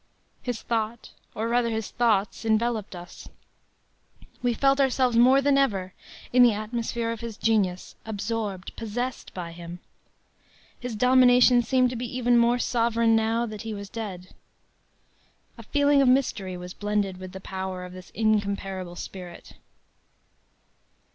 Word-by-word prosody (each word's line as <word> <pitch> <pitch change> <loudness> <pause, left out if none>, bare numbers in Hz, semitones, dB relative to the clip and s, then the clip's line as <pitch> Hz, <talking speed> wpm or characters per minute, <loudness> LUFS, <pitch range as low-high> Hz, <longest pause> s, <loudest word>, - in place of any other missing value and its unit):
His 245 -3 -4
thought, 225 0 -3 0.2
or 220 +1 -2
rather 235 0 +1
his 220 -2 -3
thoughts, 215 -4 +1
enveloped 220 -2 0
us. 175 0 -11 1.1
We 245 -2 +1
felt 275 +3 +3
ourselves 255 -2 +2
more 260 +4 +6
than 280 0 +4
ever 195 -9 0 0.4
in 250 - +6
the 240 -2 +7
atmosphere 230 +2 -3
of 230 - -5
his 230 -2 -7
genius, 195 -5 0
absorbed, 210 -3 -4
possessed 245 +3 -4
by 175 -2 -5
him. 170 +1 -9 1.0
His 245 -2 -5
domination 250 +1 +5
seemed 255 0 +2
to - - -5
be 240 0 -4
even 245 -1 +3
more 235 +1 +4
sovereign 230 -2 +2
now 225 +1 +1
that 215 -3 -7
he 220 -1 -5
was 200 -1 -8
dead. 195 -5 -6 1.3
A - - -11
feeling 285 -1 +3
of 270 - +4
mystery 230 -8 +1
was 180 0 -8
blended 205 -2 -1
with 185 0 -8
the 190 - -8
power 190 -1 -5
of 180 - -10
this 185 -1 -11
incomparable 200 -4 -1
spirit. 180 -1 -9
225 Hz, 140 wpm, -26 LUFS, 195-245 Hz, 1.3 s, the